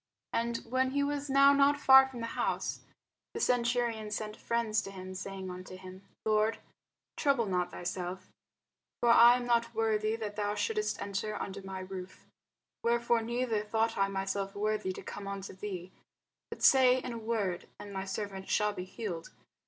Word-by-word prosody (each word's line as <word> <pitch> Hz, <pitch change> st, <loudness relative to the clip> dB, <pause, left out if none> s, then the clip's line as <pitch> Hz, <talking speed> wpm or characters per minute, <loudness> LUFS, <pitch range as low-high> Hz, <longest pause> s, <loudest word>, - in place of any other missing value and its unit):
And 235 Hz, 0 st, 0 dB
when 260 Hz, +1 st, +1 dB
he 285 Hz, 0 st, +2 dB
was 285 Hz, 0 st, -2 dB
now 275 Hz, +1 st, +6 dB
not 280 Hz, +1 st, +4 dB
far 265 Hz, -1 st, +8 dB
from 255 Hz, -3 st, -8 dB
the -, -, -2 dB
house, -, -, -1 dB, 0.6 s
the -, -, -2 dB
centurion 240 Hz, -, +1 dB
sent 210 Hz, 0 st, -4 dB
friends 230 Hz, -2 st, 0 dB
to -, -, -8 dB
him, 185 Hz, -1 st, -8 dB
saying 190 Hz, 0 st, -6 dB
unto 185 Hz, +1 st, -9 dB
him, 185 Hz, 0 st, -11 dB, 0.2 s
Lord, 215 Hz, 0 st, +2 dB, 0.6 s
trouble 275 Hz, -6 st, +2 dB
not 180 Hz, -3 st, 0 dB
thyself: 180 Hz, +1 st, -5 dB, 0.8 s
for 240 Hz, -, +4 dB
I 235 Hz, +1 st, +8 dB
am 245 Hz, -1 st, -3 dB
not 235 Hz, -1 st, +1 dB
worthy 220 Hz, -1 st, +1 dB
that 215 Hz, -2 st, -5 dB
thou 205 Hz, 0 st, -1 dB
shouldest 425 Hz, -, -1 dB
enter 200 Hz, +1 st, -3 dB
under 200 Hz, 0 st, -5 dB
my 190 Hz, -1 st, -6 dB
roof: 185 Hz, 0 st, -8 dB, 0.6 s
wherefore 235 Hz, 0 st, +2 dB
neither 235 Hz, -1 st, -1 dB
thought 225 Hz, +1 st, 0 dB
I 195 Hz, 0 st, +2 dB
myself 195 Hz, 0 st, -3 dB
worthy 210 Hz, -2 st, -1 dB
to -, -, -8 dB
come 200 Hz, -1 st, -7 dB
unto 195 Hz, -1 st, -5 dB
thee: 185 Hz, -2 st, -6 dB, 0.6 s
but -, -, -8 dB
say 255 Hz, -1 st, +7 dB
in 250 Hz, -1 st, -4 dB
a 230 Hz, -, -5 dB
word, 215 Hz, -6 st, -2 dB
and 205 Hz, -1 st, -8 dB
my 190 Hz, 0 st, -3 dB
servant 195 Hz, 0 st, -5 dB
shall 210 Hz, -1 st, +2 dB
be 180 Hz, -2 st, -5 dB
healed. 185 Hz, -4 st, -6 dB
215 Hz, 170 wpm, -31 LUFS, 195-235 Hz, 0.8 s, far